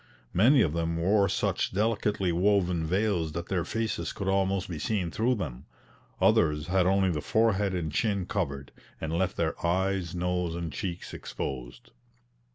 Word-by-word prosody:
Many 120 +8 +5
of 75 - 0
them 85 0 -1
wore 100 +3 +3
such - - 0
delicately 105 -2 +1
woven 90 -2 +2
veils 90 -4 0
that 85 +2 -5
their 90 -3 0
faces 115 +3 -2
could 100 - -5
almost 95 -1 +1
be 85 -4 -5
seen 95 -4 -1
through 120 +7 +1
them: 70 - -6 0.5
others 75 -2 +3
had 90 +1 +2
only 95 -1 +3
the 75 -3 -2
forehead 105 0 +2
and 80 -3 -2
chin 100 +3 0
covered, 70 -4 -3 0.3
and 80 0 -3
left 95 +2 0
their 80 -1 -1
eyes, 90 0 0
nose, 90 -1 -1
and 85 -3 -4
cheeks 90 +3 -5
exposed. - - -6
90 Hz, 160 wpm, -28 LUFS, 85-100 Hz, 0.5 s, Many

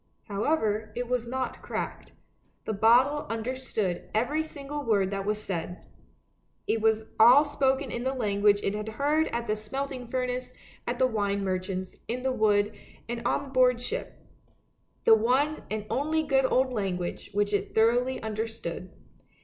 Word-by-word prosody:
However, 215 -1 0
it 245 0 -3
was 245 -1 -1
not 260 +1 -3
cracked. - - -5 0.5
The 220 - -1
bottle 245 +8 +4
understood 225 -5 -3
every 270 +8 +1
single 290 -1 -6
word 200 -6 +2
that 195 0 -3
was 210 0 0
said, 180 -3 -5 0.8
it 225 - 0
was 220 0 +2
all 250 +7 +8
spoken 270 -2 0
in 240 - -3
the 265 +1 -1
language 205 -3 +2
it 195 - 0
had 210 +1 -4
heard 300 +3 +2
at 235 0 -3
the 215 - 0
smelting 255 +3 -4
furnace, 250 0 -3 0.3
at - - -1
the 260 - +4
wine 200 -4 0
merchant's, 185 0 -3
in 250 +2 -3
the 265 - +1
wood, 210 -3 +2 0.3
and 235 0 -4
on 280 -1 -1
board 250 -2 +4
ship 440 - -4 0.5
— - - -42
the 225 - +8
one 255 +7 +2
and 215 -1 -3
only 310 +6 0
good 270 -3 +2
old 260 0 +2
language 185 -5 -3
which 205 0 +1
it 205 - -1
thoroughly 245 +4 +3
understood. 220 -5 -4
230 Hz, 155 wpm, -28 LUFS, 210-260 Hz, 0.8 s, all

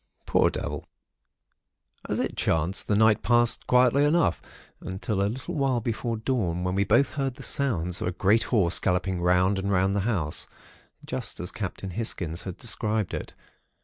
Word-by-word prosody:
Poor - - +3
devil! - - -5 1.2
"As - - 0
it - - -2
chanced, 85 +5 0
the 105 - +2
night 110 0 +4
passed 120 -1 +2
quietly 125 +2 +4
enough, 160 +3 +2 0.4
until 95 +2 -3
a 100 - +1
little 130 +9 -6
while 135 -5 +1
before 115 0 -3
dawn 110 -8 -1
when 90 0 -1
we 100 +1 +2
both 120 +7 +3
heard 135 -3 -2
the - - -10
sounds 90 -11 0
of - - -1
a - - 0
great 100 +5 +2
horse 95 -8 +3
galloping 90 0 0
round 90 +2 +3
and 100 +1 -2
round 95 0 +2
the 100 - 0
house, 80 -9 -1 0.6
just - - -3
as 90 +1 -2
old - - -26
Captain 95 -2 -5
Hisgins 85 -5 -3
had 95 -2 -6
described 110 -3 -1
it. - - -6
100 Hz, 175 wpm, -26 LUFS, 90-120 Hz, 1.2 s, night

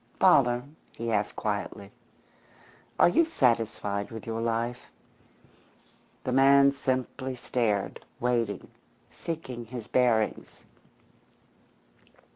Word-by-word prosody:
"Father," 120 0 +5 0.3
he 115 0 -4
asked 105 -1 0
quietly, 100 -1 -4 1.1
"are - - +6
you 175 - +4
satisfied 115 - 0
with 110 -2 -8
your 115 0 -3
life?" 115 +1 -2 1.3
The - - -2
man 140 +1 +6
simply 130 -1 -2
stared 115 -5 -1 0.2
waiting, 115 -5 -1 0.4
seeking 130 -8 -6
his 120 -1 -7
bearings. 115 -4 0
120 Hz, 85 wpm, -28 LUFS, 110-130 Hz, 1.3 s, are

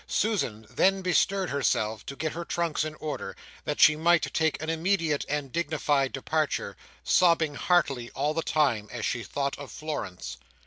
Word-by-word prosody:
Susan 150 - 0
then 195 - +2
bestirred 185 +1 +2
herself 110 -5 0
to 140 - -5
get 155 +2 -2
her 170 - -5
trunks 170 -2 -1
in 155 0 -5
order, 145 -11 -5 0.3
that 150 - -2
she 155 - +7
might 170 +2 +2
take 160 -1 +1
an 155 - -5
immediate 165 -2 +1
and 145 -2 -2
dignified 145 -4 +1
departure; 155 +2 -1 0.3
sobbing 165 -4 +3
heartily 140 -7 +1
all 145 +3 0
the 165 - 0
time, 130 -11 +1
as 115 -3 -4
she 120 - -1
thought 140 +4 -2
of 145 - -8
Florence. 90 - -5
150 Hz, 165 wpm, -27 LUFS, 135-165 Hz, 0.3 s, she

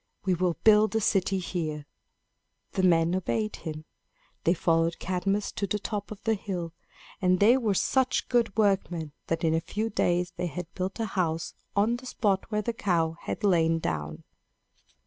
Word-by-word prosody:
We 190 - +3
will 175 -1 0
build 215 0 +5
a - - +4
city 195 -2 +1
here." 160 -5 -3 0.9
The - - -1
men 170 -2 +4
obeyed 215 +4 -1
him. 155 -1 -7 0.6
They 170 - +4
followed 165 0 +1
Cadmus 190 +3 -1
to 200 - -3
the 210 - 0
top 205 0 -4
of 205 -1 -9
the 225 - +2
hill; 180 -5 -4 0.5
and 185 -1 +3
they 225 +5 +6
were 225 -7 +1
such 260 +6 +1
good 230 -4 +1
workmen 185 -7 +1 0.2
that 165 0 -1
in 160 -1 +3
a 165 - +1
few 220 +6 -3
days 175 -2 +1
they 180 - -1
had 175 0 -6
built 190 +3 -4
a 225 - 0
house 170 -5 -1 0.2
on 215 +4 +2
the 255 +1 -11
spot 200 -5 0
where 210 -1 -1
the 235 - -1
cow 170 -7 0
had - - -5
lain 165 -4 +3
down. 75 - -4
185 Hz, 175 wpm, -28 LUFS, 165-210 Hz, 0.9 s, they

